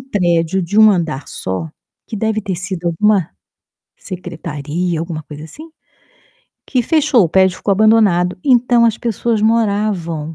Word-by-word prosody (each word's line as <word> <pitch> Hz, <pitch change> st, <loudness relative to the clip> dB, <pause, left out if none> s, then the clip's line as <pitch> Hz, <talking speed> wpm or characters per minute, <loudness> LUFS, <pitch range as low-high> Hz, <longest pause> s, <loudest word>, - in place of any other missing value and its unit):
prédio 180 Hz, -5 st, 0 dB
de 205 Hz, +6 st, -1 dB
1 215 Hz, -1 st, +8 dB
andar 160 Hz, -7 st, -2 dB
só, 95 Hz, +13 st, -5 dB, 0.4 s
que 220 Hz, -, -6 dB
deve 220 Hz, +1 st, -1 dB
ter 190 Hz, -4 st, -4 dB
sido 180 Hz, -1 st, -5 dB
alguma, 185 Hz, +1 st, +1 dB, 0.7 s
secretaria, 170 Hz, -2 st, -5 dB
alguma 160 Hz, -2 st, -5 dB
coisa 150 Hz, 0 st, -10 dB
assim, 305 Hz, -, -12 dB, 1.0 s
que 255 Hz, -, 0 dB
fechou, 290 Hz, -, +3 dB
o -, -, -1 dB
prédio 190 Hz, +1 st, +2 dB
ficou 200 Hz, -, -1 dB
abandonado, 195 Hz, -4 st, +3 dB
então, 245 Hz, -2 st, +3 dB
as 230 Hz, -1 st, +2 dB
pessoas 230 Hz, -1 st, -1 dB
moravam 200 Hz, -8 st, 0 dB
190 Hz, 140 wpm, -16 LUFS, 165-220 Hz, 1.0 s, 1